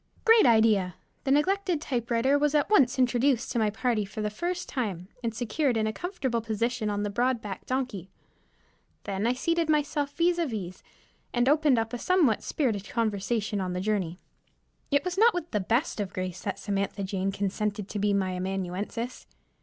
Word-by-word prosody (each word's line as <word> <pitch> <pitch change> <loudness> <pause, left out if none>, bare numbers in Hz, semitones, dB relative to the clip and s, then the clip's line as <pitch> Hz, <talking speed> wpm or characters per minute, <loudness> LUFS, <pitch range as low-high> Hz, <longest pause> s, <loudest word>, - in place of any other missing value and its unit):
Great 455 - +7
idea! 215 -6 +4 0.3
The 270 - +1
neglected 365 +3 +2
typewriter 245 -1 +1
was 295 +1 +2
at 295 +7 +2
once 275 - +5
introduced 250 0 +2
to 240 - 0
my 215 -1 +2
party 220 0 0
for 200 +2 -6
the 210 - -1
first 355 +10 -3
time, 195 - -3
and 230 - 0
secured 240 +3 0
in 220 - +1
a 220 - -1
comfortable 270 - -2
position 225 +1 -1
on 205 0 -1
the 205 - -2
broad 245 +3 +1
backed 200 -4 -7
donkey. 250 -8 -2 0.9
Then 200 +2 -1
I 245 - +3
seated 335 +5 0
myself 295 -1 +1
vis 345 +1 +2
à 335 - +1
vis, 185 -5 -5 0.5
and 240 +1 +2
opened 295 -2 +4
up 225 0 -1
a 245 - -3
somewhat 335 - +3
spirited 220 -9 -1
conversation 215 -2 -1
on 180 -1 -2
the 180 - -2
journey. 190 -4 -1 0.7
It 285 +3 +2
was 365 +1 -2
not 455 -1 +6
with 340 -2 -4
the 210 - +1
best 230 - 0
of 200 -2 -3
grace 185 -1 -4
that 200 - -3
Samantha 200 0 -2
Jane 195 0 -1
consented 200 +1 -2
to 210 - -3
be 205 +1 +2
my 195 -2 +1
amanuensis. 190 +6 -4
230 Hz, 185 wpm, -28 LUFS, 200-280 Hz, 0.9 s, Great